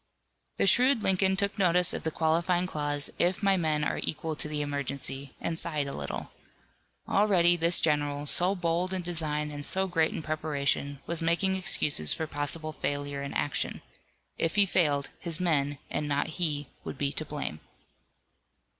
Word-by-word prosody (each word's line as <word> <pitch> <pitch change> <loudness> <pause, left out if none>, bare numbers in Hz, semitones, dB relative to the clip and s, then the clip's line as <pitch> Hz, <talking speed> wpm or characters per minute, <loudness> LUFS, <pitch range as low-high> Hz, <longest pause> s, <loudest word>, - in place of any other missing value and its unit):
The - - +2
shrewd 245 +4 +4
Lincoln 190 0 +2
took 200 0 -1
notice 180 -1 +4
of - - -3
the 160 - -1
qualifying 170 +3 +1
clause, 145 -4 -1
"if 180 +4 +1
my 195 -1 +4
men 155 -4 0
are - - -1
equal 155 +1 -3
to - - -1
the 150 0 -3
emergency," 140 -1 -3
and 165 0 -3
sighed 155 -4 -2
a 140 - -5
little. 70 -1 -5 0.8
Already 185 -4 +4
this 170 0 +4
general, 145 -2 0
so 180 +6 +2
bold 175 +1 -1
in 185 -1 -2
design 155 -3 0
and 145 0 -6
so 190 +5 +2
great 165 -4 +1
in - - -5
preparation 145 -2 -1
was 170 0 -3
making 170 +4 +1
excuses 150 - +2
for 160 - -3
possible 155 +2 -1
failure 145 -1 -3
in 140 - -6
action 145 - -1 0.6
if 165 - 0
he 205 -1 +6
failed 145 -7 +1
his 165 -2 -1
men 145 -5 +1
and 150 - -2
not 145 0 0
he 150 -4 +1 0.2
would - - -6
be 140 0 0
to 155 - -2
blame. 145 - -4
160 Hz, 170 wpm, -28 LUFS, 145-180 Hz, 0.8 s, he